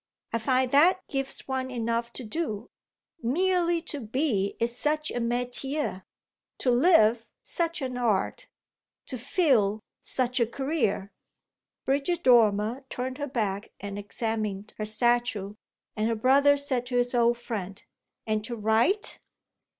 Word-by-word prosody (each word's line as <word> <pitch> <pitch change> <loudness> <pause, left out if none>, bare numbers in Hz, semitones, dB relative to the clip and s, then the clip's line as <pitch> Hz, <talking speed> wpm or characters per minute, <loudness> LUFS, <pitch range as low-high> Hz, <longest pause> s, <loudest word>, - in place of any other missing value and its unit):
I 230 - +1
find 255 +2 +1
that 350 +6 +4
gives 270 -1 -3
one 260 -1 -2
enough 235 -1 -2
to 255 - -6
do. 230 -3 -4 0.5
Merely 345 +5 +1
to 300 -3 -5
be 220 -4 -1
is 235 +1 -1
such 305 +3 0
a - - -2
métier; 245 -2 0 0.5
to 250 - +1
live 240 -5 +4 0.2
such 335 -3 -2
an 255 -1 -3
art; 235 - 0 0.6
to 255 - -4
feel 230 - +2 0.2
such 255 0 -1
a 235 - +3
career!" 240 -7 -1 0.7
Bridget 285 +6 0
Dormer 230 0 +4
turned 255 +2 -4
her 290 - -2
back 210 -7 -3
and 200 0 -6
examined 210 -1 -3
her 215 - -1
statue, 220 -2 +1 0.4
and 215 +1 0
her 230 - 0
brother 280 +5 +4
said 260 -4 0
to 245 0 -1
his 245 0 +2
old 240 0 +3
friend: 200 -5 -6 0.4
"And 215 -1 -1
to 240 - -4
write?" 225 - +1
245 Hz, 135 wpm, -27 LUFS, 220-275 Hz, 0.7 s, that